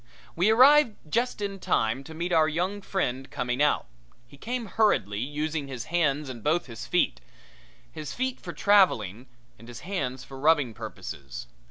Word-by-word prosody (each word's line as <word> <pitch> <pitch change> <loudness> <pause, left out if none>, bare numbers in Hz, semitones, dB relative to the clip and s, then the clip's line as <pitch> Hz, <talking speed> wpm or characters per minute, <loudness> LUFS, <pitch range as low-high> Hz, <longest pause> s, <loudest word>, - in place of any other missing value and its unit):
We 180 +5 +3
arrived 255 +1 +6 0.2
just 240 -1 0
in 200 -1 -3
time 115 -4 0
to 160 - -10
meet 170 +2 -3
our 160 -1 +5
young 180 +6 -2
friend 135 -10 -2
coming 125 -2 -2
out. 150 - +3 0.4
He 140 - -16
came 235 - -4
hurriedly, 190 - +1
using 150 +3 -3
his 130 -4 -5
hands 150 -4 +1
and 130 -3 -7
his 150 -8 -1
feet - - +1
both, 60 - -27
his 155 0 -7
feet 260 0 -2
for - - -7
traveling 130 - +3 0.3
and 115 - -14
his 120 -1 -9
hands 130 -10 -3
for 135 -1 -10
rubbing 150 -5 +3
purposes. 70 -9 -8
150 Hz, 165 wpm, -27 LUFS, 125-195 Hz, 0.4 s, arrived